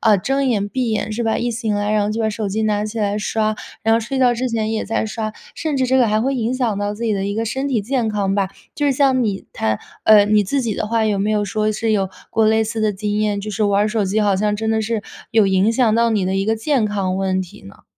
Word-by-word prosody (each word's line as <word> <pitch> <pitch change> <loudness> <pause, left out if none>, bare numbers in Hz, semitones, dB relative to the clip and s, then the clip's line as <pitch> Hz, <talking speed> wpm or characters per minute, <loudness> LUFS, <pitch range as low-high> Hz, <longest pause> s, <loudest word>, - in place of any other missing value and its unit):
呃， 215 -4 +4
睁 270 +6 0
眼、 205 -5 0
闭 250 0 -1
眼 215 0 -1
是 230 +3 -2
吧， 225 -1 0
一 240 +1 -1
醒 225 -2 -2
来， 205 +1 -1
然 210 -1 +2
后 210 - -1
就 225 +2 -2
把 220 - +1
手 215 0 -3
机 220 +3 -1
拿 210 -1 0
起 220 +1 -5
来 205 -1 0
刷， 215 0 -1 0.3
然 225 0 +3
后 230 - +3
睡 250 +4 -3
觉 250 -2 +4
之 255 +2 -2
前 220 -1 -1
也 220 - -2
在 220 0 -1
刷， 215 0 -4 0.2
甚 310 -3 -2
至 260 -1 +1
这 260 +1 +2
个 250 -3 +4
还 215 +1 +2
会 270 +3 0
影 240 0 -1
响 240 -5 0
到 205 0 -1
自 235 +3 -5
己 220 - +1
的 195 -1 -1
一 200 0 -2
个 225 - 0
身 265 +5 -2
体 240 -6 +1
健 235 +1 -1
康 200 -2 0
吧？ 195 -2 +1 0.3
就 290 - -2
是 - - +3
像 265 -2 +3
你 200 -4 -2
摊 110 -1 -1 0.3
呃， 210 -2 +7
你 210 0 +3
自 270 +8 -1
己 225 -5 -2
的 - - -2
话， 225 0 +1
有 210 -2 +1
没 205 +2 0
有 210 -1 +1
说 215 +1 0
是 220 +1 -1
有 195 -2 +1 0.2
过 225 - +2
类 220 0 +3
似 220 0 -3
的 215 -1 +1
经 205 +1 -2
验， 205 -1 0
就 215 - -5
是 215 +2 -1
玩 200 0 +3
儿 - - 0
手 215 -1 0
机 205 +3 0
好 205 -2 +2
像 210 +2 0
真 220 +1 -2
的 220 0 +1
是 225 0 -1 0.3
有 220 -3 +4
影 195 +3 +3
响 230 -3 +2
到 230 0 +3
你 205 -4 +1
的 190 - -1
一 195 - 0
个 225 +2 +1
健 245 0 +1
康 195 -3 -1
问 190 -1 0
题 180 - -9
呢？ 100 - -15
215 Hz, 315 characters per minute, -19 LUFS, 205-230 Hz, 0.3 s, 呃